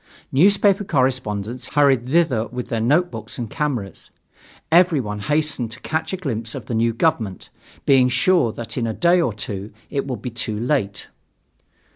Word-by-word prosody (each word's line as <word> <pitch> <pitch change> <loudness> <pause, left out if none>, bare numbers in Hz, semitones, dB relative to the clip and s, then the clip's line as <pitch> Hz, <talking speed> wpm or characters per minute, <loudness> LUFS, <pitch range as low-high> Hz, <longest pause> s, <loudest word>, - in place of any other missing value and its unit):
Newspaper 200 +6 +4
correspondents 125 - -1
hurried 135 -4 +3
thither 135 -8 +2
with 125 0 -6
their 115 -2 -1
notebooks 120 -4 0
and 115 -3 -5
cameras. 125 -10 -3 0.6
Everyone 155 - +3
hastened 150 +1 -1
to 115 - -10
catch 160 +1 -2
a 190 - -2
glimpse 115 -9 -3
of 130 -6 -7
the 120 - -5
new 115 +1 +2
government, 115 - -1 0.4
being 130 -2 +5
sure 130 0 +3
that 115 +2 -6
in 115 - -1
a 110 - -3
day 175 +1 +4
or 145 - +1
two 100 0 -6 0.2
it 140 -1 -2
would 125 -6 -5
be 125 - -4
too 110 -2 -3
late. 115 -5 -1
125 Hz, 160 wpm, -21 LUFS, 110-150 Hz, 0.6 s, being